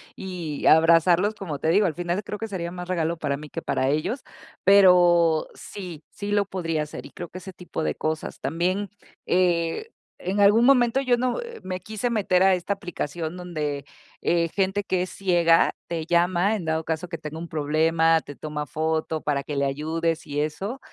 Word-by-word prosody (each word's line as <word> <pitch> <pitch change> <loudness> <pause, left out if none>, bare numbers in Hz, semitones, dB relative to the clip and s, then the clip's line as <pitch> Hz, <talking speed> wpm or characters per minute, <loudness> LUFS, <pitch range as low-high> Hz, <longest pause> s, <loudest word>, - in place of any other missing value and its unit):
y 175 -6 -5
abrazarlos, 170 +5 +5
como 160 -9 -5
te 160 - 0
digo. 200 +5 +4
Al 170 - 0
final, 175 +5 -2
creo 210 +1 -6
que 225 - -3
sería 175 -4 -4
más 180 0 -7
regalo 170 -2 0
para 145 -3 -2
mí, 150 +1 -10
que 165 - -5
para 130 -4 0
ellos, 155 - -1 0.4
pero 175 -4 +5
sí, 180 -6 -9
sí 205 0 -6
lo 205 -1 +2
podría 165 -5 -2
hacer 150 - -8
y - - -11
creo 175 -2 -8
que - - -9
ese 190 +1 -9
tipo 175 -2 -5
de - - 0
cosas. 155 0 -3
También, 180 +7 -1 0.4
eh, 175 - +1 0.3
en 190 +3 -1
algún 205 +4 +6
momento 255 -1 +4
yo 250 -3 +2
no, 250 - -1
eh, 470 -1 -9
me 185 0 -4
quise 215 +4 -3
meter 190 -5 +2
a 190 0 +5
esta 180 +2 -1
aplicación 175 -3 -5
donde, 150 -6 -4 0.4
eh, 170 -1 +1
gente 195 +3 0
que 185 -2 0
es 180 - -3
ciega 175 -3 +3 0.2
te 165 -2 -3
llama, 175 +4 +2
en 200 - -4
dado 160 0 0
caso 160 +2 -3
que 165 - -4
tenga 155 +1 -7
un 170 - -6
problema, 160 +2 +2
te 145 - -10
toma 150 0 -5
foto 160 +1 -1
para 145 -2 0
que 145 +1 -6
le 140 0 +1
ayudes 160 +4 -2
y 145 0 -1
eso, 195 - -3
175 Hz, 195 wpm, -25 LUFS, 160-195 Hz, 0.4 s, algún